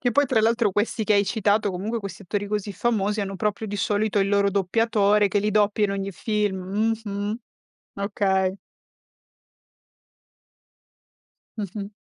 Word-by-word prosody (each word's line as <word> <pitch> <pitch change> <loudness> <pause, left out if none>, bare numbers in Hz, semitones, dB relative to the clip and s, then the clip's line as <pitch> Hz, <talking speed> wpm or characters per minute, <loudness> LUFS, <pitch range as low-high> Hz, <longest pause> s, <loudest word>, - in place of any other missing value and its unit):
Che 245 - +1
poi 285 +4 +3
tra 235 -3 +2
l'altro 225 -1 +2
questi 215 +2 0
che 215 - +2
hai 200 0 +4
citato, 205 +1 +1
comunque 210 +6 -3
questi 200 -1 -8
attori 205 +2 -3
così 210 -1 -3
famosi, 210 0 0
hanno 195 -1 -3
proprio, 210 +2 -2
di 205 0 -4
solito, 205 +1 0
il 195 0 +2
loro 200 0 +3
doppiatore 205 +1 +2
che 205 - +1
li 210 +1 0
doppia 210 0 +2
in 200 - 0
ogni 195 0 -3
film. 210 +1 -1
Mh-mh. 205 +2 -3 0.6
Okay. 195 -1 0 3.0
Mh-mh. 200 -1 -5
205 Hz, 145 wpm, -24 LUFS, 200-215 Hz, 3.0 s, hai